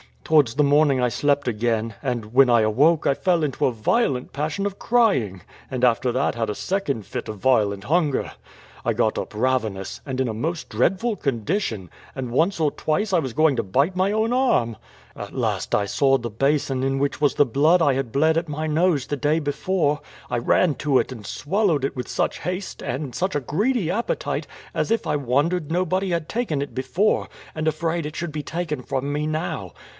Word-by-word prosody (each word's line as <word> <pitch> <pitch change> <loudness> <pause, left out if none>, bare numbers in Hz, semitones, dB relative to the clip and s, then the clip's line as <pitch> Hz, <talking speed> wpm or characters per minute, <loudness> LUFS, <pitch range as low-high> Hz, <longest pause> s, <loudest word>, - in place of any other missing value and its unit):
Towards 145 -7 +3
the 150 - +3
morning 145 -2 +4
I 125 - +2
slept 145 +3 +1
again, 115 0 -1
and 120 -5 -3
when 135 0 +6
I 120 -1 +5
awoke 145 +10 +3
I - - +4
fell 175 +2 +1
into 145 -3 0
a - - +2
violent 125 - 0
passion 155 +7 -2
of 200 -1 -4
crying, 135 - +2 0.3
and 130 -2 -4
after 125 0 +3
that 130 +3 +1
had 115 -2 -1
a 105 - -2
second 145 - -2
fit - - -5
of 110 - -6
violent 100 -4 +2
hunger. 155 -1 +1 0.5
I - - +2
got - - +1
up - - -6
ravenous, 110 -5 -1
and 130 -2 -2
in 130 - 0
a - - -2
most 160 +9 -3
dreadful 195 - +1
condition; 120 - -2 0.3
and 130 -3 -4
once 165 +7 +1
or 150 -2 +3
twice 195 +7 -1
I 175 - +5
was 130 -6 -4
going 155 -2 +3
to - - +2
bite 140 - +1
my 190 +2 +2
own 220 +2 +1
arm. 180 - +2 0.4
At - - -8
last - - -1
I 100 - +1
saw 135 +6 +3
the 120 -2 -5
basin 135 +2 0
in 135 +1 0
which 140 +1 -1
was 145 - +3
the 145 - +5
blood 150 +8 +3
I 145 -4 +4
had 130 -3 -3
bled 160 +3 +3
at 170 +1 -1
my 155 +2 -3
nose 155 -3 +1
the 145 - -2
day 150 +4 +1
before: 150 +1 0 0.3
I - - +1
ran 150 +6 +2
to 145 -3 +1
it, - - 0
and 110 -5 -8
swallowed 175 -3 0
it 135 - -1
with 125 - -4
such - - -1
haste, 180 +3 -4
and 135 0 -4
such 185 +8 -1
a 145 - +1
greedy 195 - 0
appetite, 230 +5 -2 0.3
as - - -1
if 230 - +1
I 150 - 0
wondered 145 +5 0
nobody 185 +2 0
had 165 -2 -2
taken 215 - -1
it 140 - -5
before, 170 +11 0 0.3
and 155 0 -3
afraid 165 +1 -1
it 150 +1 -6
should 170 -2 -4
be 150 0 -4
taken 160 -3 -3
from 135 +2 -3
me 150 +1 -1
now. 155 +2 -3
145 Hz, 205 wpm, -23 LUFS, 125-170 Hz, 0.5 s, when